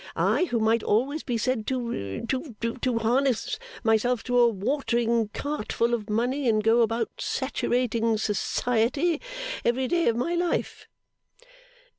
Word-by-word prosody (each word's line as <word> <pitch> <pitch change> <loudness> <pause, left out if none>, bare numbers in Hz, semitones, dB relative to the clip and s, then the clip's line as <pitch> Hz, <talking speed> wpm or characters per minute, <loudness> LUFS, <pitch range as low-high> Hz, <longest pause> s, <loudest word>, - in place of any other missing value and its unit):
I, 360 - +2
who 240 -9 -1
might 225 +1 +2
always 270 +10 +1
be 240 -3 -2
said 225 -1 -1
to 235 - -3
to 260 0 -3 0.2
to 250 -1 -1
harness 240 +1 +1 0.2
myself 225 +2 +2
to 245 -1 +1
a 240 - +7
watering 235 0 0
cart 285 +1 -4
full 235 +1 +1
of 220 -2 -2
money, 245 +5 0
and 215 -1 +2
go 225 +2 +4
about 230 0 0
saturating 240 -4 0
Society 245 - 0 0.4
every 255 +2 +1
day 345 +2 +1
of 230 - +3
my 250 +9 -1
life. 345 0 -2
235 Hz, 140 wpm, -26 LUFS, 225-260 Hz, 0.4 s, a